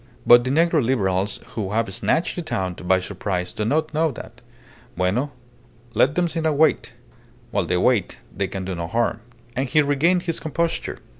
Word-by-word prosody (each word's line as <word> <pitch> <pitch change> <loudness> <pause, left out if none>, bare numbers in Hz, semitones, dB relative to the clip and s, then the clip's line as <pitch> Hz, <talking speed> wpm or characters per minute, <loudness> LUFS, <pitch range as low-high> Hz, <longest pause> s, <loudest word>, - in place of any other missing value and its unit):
But 120 0 +8
the 130 - -2
negro 160 +1 +3
Liberals 100 -5 0
who 105 -3 -4
have 110 -3 0
snatched 160 - 0
the 175 - -3
town 95 - -2
by 95 +1 +1
surprise 90 -1 -3
do 105 - -3
not 155 +6 0
know 160 +1 +2
that. 130 - -10 0.6
Bueno. 100 +10 +1 0.6
Let 140 +4 +3
them 180 -1 +2
sit 165 -1 -3
and 155 -3 +1
wait. 160 +1 +2 0.6
While - - 0
they 90 - +1
wait 105 0 +1 0.2
they 95 +2 -1
can 95 0 -5
do 95 - -3
no 85 -1 -4
harm." 115 +3 0 0.4
And 130 +1 -1
he 155 +3 +4
regained 165 +6 +2
his 165 -3 -2
composure. 165 +2 -2
120 Hz, 180 wpm, -22 LUFS, 95-155 Hz, 0.6 s, But